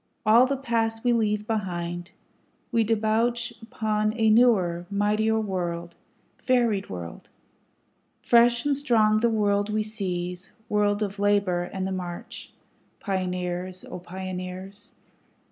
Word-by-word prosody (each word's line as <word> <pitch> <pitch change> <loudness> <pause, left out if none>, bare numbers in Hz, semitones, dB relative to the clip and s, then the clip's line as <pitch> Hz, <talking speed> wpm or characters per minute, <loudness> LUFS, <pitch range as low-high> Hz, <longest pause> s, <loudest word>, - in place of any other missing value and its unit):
All 230 +4 +6
the 275 +1 -1
past 225 -3 -1
we 245 -1 +3
leave 210 -2 0
behind, 175 -5 -3 0.6
We 230 -2 +3
debouch 225 +2 0
upon 215 -1 -1
a 220 -1 +4
newer, 190 -7 +3
mightier 210 +2 +1
world, 175 -4 -3 0.5
varied 235 -6 +1
world; 85 -2 -8 0.9
Fresh 235 +1 +4
and 290 -1 +2
strong 225 -6 +3
the 235 +1 +3
world 205 -2 +1
we 215 0 0
seize, 180 -4 -4 0.2
world 205 0 +2
of 200 0 -5
labor 200 -4 +1
and 190 -1 -3
the 190 - -3
march, 180 -2 -6 0.5
Pioneers! 180 -1 -3
O 180 - -7
Pioneers! 185 +2 -7
205 Hz, 120 wpm, -26 LUFS, 185-225 Hz, 0.9 s, All